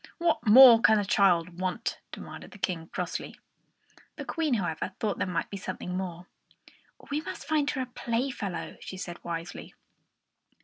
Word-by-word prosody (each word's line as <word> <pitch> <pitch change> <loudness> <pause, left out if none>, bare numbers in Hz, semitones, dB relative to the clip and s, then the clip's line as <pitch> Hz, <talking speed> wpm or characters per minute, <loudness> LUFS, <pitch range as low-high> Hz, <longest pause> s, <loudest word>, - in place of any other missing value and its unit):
"What 335 -8 0
more 235 +1 +10
can 220 0 +5
the 205 - 0
child 180 -3 +2
want?" 185 -1 -2
demanded - - -9
the - - -13
King, 170 -4 -3
crossly. 180 0 -5 0.8
The - - -7
Queen, 315 -6 0
however, 180 -2 -2
thought 210 -2 -1
there - - 0
might 180 -2 -2
be 200 - -4
something 185 -1 -5
more. 180 -2 -5 0.9
"We 295 +2 0
must - - -8
find 300 -2 +1
her 265 - -2
a - - -2
playfellow," 235 -5 -3
she 190 - -8
said 175 -2 -7
wisely. 170 0 -6
195 Hz, 160 wpm, -28 LUFS, 180-245 Hz, 0.9 s, more